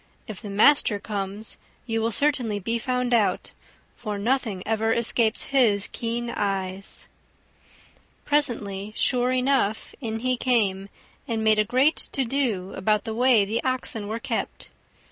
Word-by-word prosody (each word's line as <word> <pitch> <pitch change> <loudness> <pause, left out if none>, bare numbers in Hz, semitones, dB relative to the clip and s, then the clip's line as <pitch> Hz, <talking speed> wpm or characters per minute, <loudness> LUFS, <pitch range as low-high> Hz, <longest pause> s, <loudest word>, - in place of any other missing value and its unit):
If 215 -5 -8
the 205 - -7
master 210 +1 +4
comes, 200 +1 -4 0.3
you 225 -2 -1
will 225 - +1
certainly 245 -3 +1
be 230 +4 -2
found 250 0 -1
out, 220 -4 +1 0.4
for 210 -3 -5
nothing 220 -3 -1
ever 225 +1 0
escapes 230 0 +1
his 215 -7 +4
keen 235 0 -3
eyes." 195 -2 -2 1.2
Presently, 215 -8 0
sure 250 0 +1
enough, 255 -4 +1
in 225 -2 -4
he 255 0 0
came, 200 -6 +1 0.4
and 225 -3 -1
made 215 -1 +4
a - - +5
great 260 +8 +2 0.2
to 270 - 0
do 230 -8 -1
about 210 +1 +1
the 225 -2 -4
way 240 -3 +4
the 220 +4 -2
Oxen 250 -5 -2
were 220 +2 -3
kept. 235 -1 -4
225 Hz, 145 wpm, -25 LUFS, 205-250 Hz, 1.2 s, a